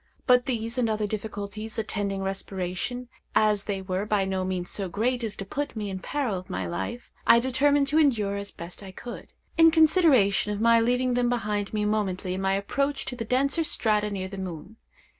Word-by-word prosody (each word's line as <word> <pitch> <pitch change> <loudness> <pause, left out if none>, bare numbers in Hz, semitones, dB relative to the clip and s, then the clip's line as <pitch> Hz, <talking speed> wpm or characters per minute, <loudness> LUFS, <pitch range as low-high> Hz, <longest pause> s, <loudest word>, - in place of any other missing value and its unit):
But 250 -1 +4
these 235 -1 -2
and 235 -2 +2
other 215 -1 0
difficulties 210 +1 -5
attending 200 -3 -2
respiration, 195 +5 -3 0.3
as 210 -2 +3
they 195 -2 -3
were 185 +1 -2
by 210 -2 +1
no 190 -1 -1
means 185 -1 -2
so 195 -3 -2
great 240 +6 0
as 215 -2 0
to 195 - -6
put 285 +8 -4
me 210 -2 -3
in 190 - -4
peril 240 -3 -2
of 185 - -14
my 90 0 -2
life, 95 - -5 0.2
I - - +8
determined 275 +3 +3
to 305 +2 +3
endure 220 -10 +2
as 200 0 -5
I - - -28
best 170 +4 -8
could, 240 - -8 0.3
in 325 0 +9
consideration 310 - +4
of 205 - -3
my 230 +1 +5
leaving 250 +2 +2
them 245 0 +2
behind 210 -4 -1
me 210 -1 0
momently 195 -4 -1
in 190 - -3
my 195 0 +1
approach 275 +8 -1
to 250 - -4
the 230 -2 -4
denser 275 +7 +1
strata 210 -7 +1
near 190 -2 -3
the 195 0 -7
moon. 185 +3 -7
210 Hz, 200 wpm, -26 LUFS, 195-245 Hz, 0.3 s, in